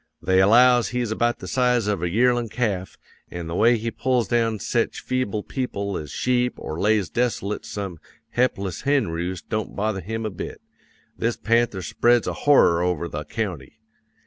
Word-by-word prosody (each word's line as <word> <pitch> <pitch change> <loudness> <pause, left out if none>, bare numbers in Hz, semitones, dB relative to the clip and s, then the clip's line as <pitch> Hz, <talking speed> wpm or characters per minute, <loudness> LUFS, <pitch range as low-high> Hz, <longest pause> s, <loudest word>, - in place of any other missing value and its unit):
They 95 0 +3
allows 120 +3 +5
he's 120 -1 -2
about 120 +2 +1
the - - -9
size 125 -3 +2
of 105 -4 -1
a 90 - 0
yearlin' 120 +3 +2
calf; 100 -6 -2 0.3
an' 85 -1 -6
the 85 - -5
way 115 +6 +4
he 115 +1 -3
pulls 125 -2 0
down 115 -2 +1
sech 115 +3 -1
feeble 120 -5 -2
people 100 -7 -3
as 75 - -5
sheep 125 - 0
or 80 - -6
lays 105 -2 +2
desolate 110 -3 -2
some 95 -5 -5 0.4
he'pless 100 -7 0
henroost 95 - -1
don't 110 -1 -3
bother 105 -1 -1
him 110 +5 -4
a 110 - -2
bit. 95 - -7 0.6
This 115 0 -1
panther 115 -4 +1
spreads 120 +9 +2
a - - -2
horror 110 -12 +4
over 90 -2 -1
the 75 -2 -5
county. 90 - -5
110 Hz, 170 wpm, -23 LUFS, 95-120 Hz, 0.6 s, allows